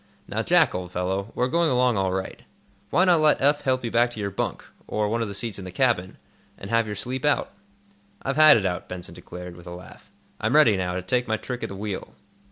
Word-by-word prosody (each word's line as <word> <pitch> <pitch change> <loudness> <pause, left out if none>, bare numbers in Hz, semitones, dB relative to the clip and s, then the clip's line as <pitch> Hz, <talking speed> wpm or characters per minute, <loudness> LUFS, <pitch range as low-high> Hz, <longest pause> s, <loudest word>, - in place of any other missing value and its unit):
Now, - - -2
Jack, - - +4
old 90 -1 -5
fellow, 95 +4 -2
we're 125 - +1
going 170 +4 +2
along 125 -2 +3
all 95 -2 0
right. 95 0 -4 0.5
Why 185 - +3
not 175 -4 +4
let 155 -1 +4
Eph 145 +2 +3
help 130 -2 0
you 115 - -3
back 120 +1 +3
to 120 - -9
your 100 -1 -2
bunk, 100 - -3 0.2
or 105 -1 0
one 115 +2 -1
of 115 - -1
the 100 - -6
seats 105 0 -4
in 95 - -7
the - - -6
cabin, 95 -3 0 0.4
and 95 - -8
have 115 -1 +2
your 105 - -4
sleep 125 +5 -4
out?" 145 0 +1 0.7
"I've 135 - -1
had 155 -2 +8
it 100 - -1
out," 90 -1 -3
Benson 90 -1 -7
declared, 90 -1 -9
with 90 0 -14
a 85 - -7
laugh. 90 0 -14 0.3
"I'm 110 +6 0
ready, 135 -9 +6
now, 90 -1 -2
to 90 - -3
take 125 +6 0
my 110 0 0
trick 125 +2 -6
at - - -3
the 100 - -7
wheel." 100 -1 -5
110 Hz, 245 wpm, -25 LUFS, 95-125 Hz, 0.7 s, had